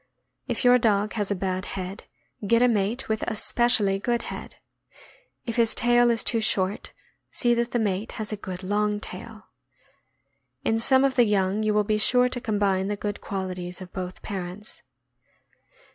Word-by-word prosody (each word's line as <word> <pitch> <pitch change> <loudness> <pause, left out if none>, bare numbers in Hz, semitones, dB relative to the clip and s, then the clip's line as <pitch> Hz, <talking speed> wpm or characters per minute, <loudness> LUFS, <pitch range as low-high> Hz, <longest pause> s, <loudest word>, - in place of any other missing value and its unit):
If - - -2
your 250 0 +6
dog 210 -2 +1
has 205 -3 -2
a 200 - 0
bad 185 0 -2
head, 190 +3 -6 0.4
get 230 +3 +4
a - - +6
mate 220 +2 0
with 220 0 -1
a 225 - -2
specially 215 -4 +2
good 235 +3 -1
head. - - -9 0.9
If 230 -1 -4
his 230 -1 +2
tail 240 +1 +4
is 230 -1 +1
too 230 -2 +1
short, 200 -2 -1 0.4
see 240 -1 +2
that 235 0 0
the 240 - -1
mate 205 -1 -2
has 215 -1 -5
a - - -1
good 185 -2 -7
long 210 +2 0
tail. - - -9 1.1
In 225 - +1
some 260 +3 +5
of 275 -1 +2
the 245 -2 +4
young 200 0 +1
you 215 0 +1
will 210 - +3
be 215 +1 0
sure 250 +3 +5
to 245 -1 -3
combine 200 -3 0
the 205 0 -2
good 205 0 -4
qualities 185 -2 -5
of 185 -1 -11
both 185 -1 -6
parents. 195 +1 -7
210 Hz, 175 wpm, -25 LUFS, 195-235 Hz, 1.1 s, your